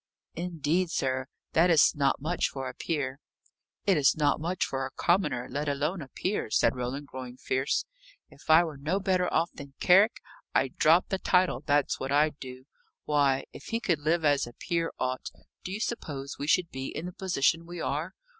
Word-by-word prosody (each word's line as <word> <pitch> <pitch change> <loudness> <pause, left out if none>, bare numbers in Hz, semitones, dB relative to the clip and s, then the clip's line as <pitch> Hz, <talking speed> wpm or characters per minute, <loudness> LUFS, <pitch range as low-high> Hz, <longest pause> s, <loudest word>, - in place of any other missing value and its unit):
"Indeed, 170 0 -1
sir! 130 -4 -1 0.3
That 170 +3 +4
is 160 -4 +6
not 140 -2 +1
much 165 +5 0
for 135 -1 -5
a 130 - -6
peer." 140 -5 -3 0.7
"It's 155 -7 +4
not 145 -1 +2
much 175 +3 0
for 135 0 -3
a 130 - -3
commoner, 170 -6 0
let 145 +1 -2
alone 150 +6 -1
a 140 - -8
peer," 185 - -2
said 115 +2 +3
Roland, 125 +3 -4
growing 130 -2 -8
fierce. 130 +1 0 0.4
"If - - -19
I 160 +2 +7
were 155 -4 -6
no 155 +8 -1
better 185 -2 +1
off 165 +2 +1
than 140 -1 -11
Carrick, 195 +5 +5 0.4
I'd 135 -1 +1
drop 165 +4 +4
the 190 - -1
title; 180 -1 +2
that's 145 -1 +2
what 135 +1 -3
I'd 150 +1 +2
do. 130 0 -9 0.4
Why, 140 -3 +2
if - - -11
he 230 - -2
could 175 -9 0
live 160 +2 +1
as 145 -4 +3
a 120 - -11
peer 165 +5 -2
ought, 130 0 -2 0.3
do 185 - -5
you 200 - -3
suppose 140 - -4
we 145 - -3
should 170 +2 +2
be 130 0 -5
in 160 - -5
the 180 - -5
position 170 -4 +1
we 175 0 -7
are? 150 +6 -3
150 Hz, 190 wpm, -28 LUFS, 135-175 Hz, 0.7 s, I